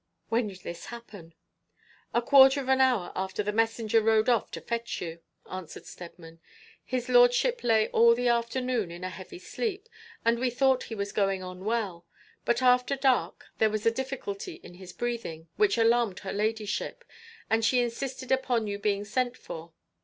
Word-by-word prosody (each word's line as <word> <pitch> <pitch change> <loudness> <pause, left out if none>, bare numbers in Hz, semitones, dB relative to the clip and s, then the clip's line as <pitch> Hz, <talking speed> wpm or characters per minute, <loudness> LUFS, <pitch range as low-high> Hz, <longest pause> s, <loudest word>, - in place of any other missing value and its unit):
'When 230 0 +1
did 190 -2 -10
this 170 -1 -8
happen?' 205 -9 -11 0.8
'A 240 - +1
quarter 270 +2 +7
of 265 -1 -5
an 265 0 +4
hour 245 -9 +2
after 190 +2 -2
the 210 - -1
messenger 225 0 +2
rode 220 +1 +3
off 235 -4 +2
to - - -6
fetch 235 0 -3
you,' 165 -1 -6 0.3
answered 185 -3 -8
Steadman. 165 -1 -11 0.4
'His 250 -1 -3
lordship 245 - +4
lay 220 -2 +3
all 235 +1 +5
the 245 +1 0
afternoon 235 -2 0
in 170 +1 -9
a 185 - -3
heavy 190 - -10
sleep, 410 +2 -4 0.4
and 235 0 +3
we 255 0 +1
thought 260 +1 +2
he 225 - -6
was 200 -1 -3
going 195 -2 0
on 185 +1 -8
well; 200 -7 -2 0.4
but 235 +2 +1
after 250 +2 +4
dark 265 -2 +1
there 220 - +4
was 215 0 -3
a 230 - +5
difficulty 255 -5 -5
in - - -12
his 180 0 -11
breathing 200 -10 -4
which 210 +1 +3
alarmed 230 -3 +3
her 190 - -5
ladyship, 215 - -2 0.4
and 225 +1 +1
she 240 +3 +3
insisted 255 +2 -3
upon 250 -4 +1
you 200 -1 -4
being 205 0 0
sent 245 +3 -1
for. 165 +1 -9
225 Hz, 175 wpm, -28 LUFS, 200-250 Hz, 0.8 s, quarter